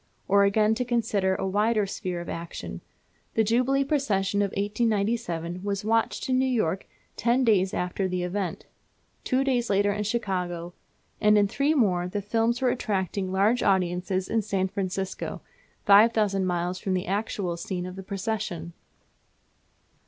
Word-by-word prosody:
Or 200 0 +5
again, 215 +2 +3
to 250 +3 -1
consider 215 -6 +1
a 190 - -2
wider 210 +2 +2
sphere 180 -2 -4
of 170 - -8
action, 165 0 -6 0.5
the 225 - +4
Jubilee 255 +5 +2
Procession 205 -9 0
of 200 - +1
1897 200 -4 -1
was 200 0 -2
watched 225 +1 +1
in 255 -1 +2
New 260 - +2
York 205 -8 0 0.3
ten 240 +3 +2
days 195 -5 +3
after 180 +2 -1
the 180 -1 -2
event; 180 0 -3 0.6
two 260 0 +1
days 250 -3 0
later 205 0 +2
in 210 +1 -2
Chicago; 180 -6 -2 0.5
and 210 0 +5
in 205 -1 +4
three 280 +8 +1
more 180 -9 +2
the 205 +3 -3
films 230 +4 0
were 255 - +4
attracting 190 -4 -2
large 205 +6 +2
audiences 185 0 +1
in 225 - +1
San 190 -2 -1
Francisco, 190 0 -4 0.4
5000 205 -2 +5
miles 180 +1 -1
from 190 -1 -1
the 180 - -2
actual 195 -2 -2
scene 180 +1 -4
of 185 0 -7
the 190 - -7
procession! 190 -4 -4
200 Hz, 150 wpm, -26 LUFS, 185-225 Hz, 0.6 s, Or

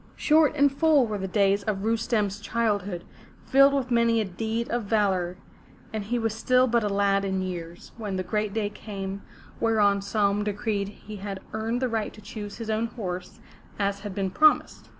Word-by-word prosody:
Short 305 -1 +4
and 285 -1 +4
full 295 -1 +4
were 210 -2 -3
the 190 - -3
days 200 +1 +2
of 200 -2 -2
Rustem's 220 -2 0
childhood, 205 -5 -1 0.4
filled 275 +1 +5
with 255 -2 -1
many 235 -1 +3
a 220 - 0
deed 220 +5 -3
of 240 -2 -1
valor, 190 -4 +1 0.6
and 215 -1 -2
he 240 +4 -1
was 225 -2 0
still 255 +3 +3
but 235 -2 +2
a 210 - 0
lad 200 0 +2
in 190 -1 -1
years, 175 -2 -7
when 210 -4 -4
the 185 - -1
great 210 +3 -1
day 210 -1 -1
came 195 -2 -6 0.4
whereon 210 -3 +3
Saum 200 0 +1
decreed 205 -1 -1
he 210 +1 -10
had 195 -1 -5
earned 225 +3 -1
the - - +3
right 225 -3 -2
to - - -13
choose 205 0 -7
his 225 -2 -4
own 220 +2 0
horse, 185 -6 -6 0.4
as 200 -1 0
had 200 -2 -7
been 195 -2 -1
promised. 310 +7 +3
210 Hz, 190 wpm, -26 LUFS, 200-230 Hz, 0.6 s, filled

